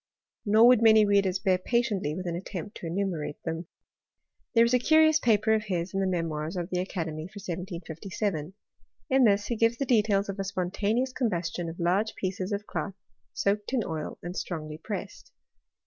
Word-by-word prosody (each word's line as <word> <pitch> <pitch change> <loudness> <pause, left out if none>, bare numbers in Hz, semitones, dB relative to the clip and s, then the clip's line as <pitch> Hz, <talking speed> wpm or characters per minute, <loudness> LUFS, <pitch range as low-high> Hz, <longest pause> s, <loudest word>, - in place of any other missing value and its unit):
Nor 215 +3 +6
would 245 -2 +6
many 220 -1 +7
readers 200 -2 +2
bear 190 -2 +1
patiently 210 - 0
with 185 - -5
an* 170 -1 -2
attempt 195 +3 -6
to 170 - -6
enumerate 170 -4 -2
them. 165 0 -3 0.9
There 230 0 +7
is 235 - 0
a 250 - +5
curious 315 +3 +5
paper 220 -3 +3
of 215 0 0
his 180 -2 -2
in 195 - 0
the 195 - +1
Memoirs 165 -2 -2
of 175 0 -4
the 180 0 0
Academy 165 -4 -4
for 205 - -14
1757. 180 -1 -4 0.6
In 265 0 +5
this 205 -1 +3
he 240 - -2
gives 230 +1 +2
the 275 - -1
details 210 -5 +2
of 195 0 -5
a - - 0
spontaneous 200 +7 -1
combustion 175 -8 -2
of 165 - -9
large. 190 +6 +1
pieces 185 +1 -3
of 205 0 -2
cloth 195 -2 -4 0.4
soaked 205 +4 0
in 245 -4 +2
oil 160 -2 -4
and 175 +1 -5
strongly 155 -4 -5
pressed. 200 - -7
195 Hz, 180 wpm, -28 LUFS, 175-215 Hz, 0.9 s, many